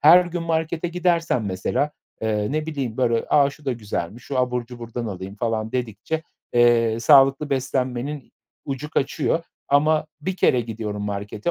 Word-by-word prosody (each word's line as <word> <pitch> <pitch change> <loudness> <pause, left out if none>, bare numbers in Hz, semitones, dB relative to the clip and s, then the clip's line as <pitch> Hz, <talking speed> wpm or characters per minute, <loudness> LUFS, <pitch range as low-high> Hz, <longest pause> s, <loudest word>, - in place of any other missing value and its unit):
her 175 +4 +8
gün 175 0 -3
markete 165 +1 -1
gidersem 170 -8 +1
mesela, 95 +10 -1 0.3
eee, 105 +1 0
ne 155 0 -1
bileyim, 135 -8 -3
böyle: 115 -3 +1
"A, 140 -1 +5
şu 145 +1 -16
da 135 - 0
güzelmiş, 110 -1 -5
şu 135 - -3
abur 125 -1 0
cuburdan 120 -1 -6
alayım." 95 -1 -6
falan 110 0 -2
dedikçe, 125 +6 -2 0.3
eee, 115 -2 +4
sağlıklı 135 +2 +5
beslenmenin 130 0 -2 0.3
ucu 140 +2 -4
kaçıyor 160 +3 0 0.2
ama 155 +2 +3
1 185 +5 -3
kere 125 - +4
gidiyorum 110 -3 -4
markete 105 +6 -3
125 Hz, 150 wpm, -23 LUFS, 115-150 Hz, 0.3 s, her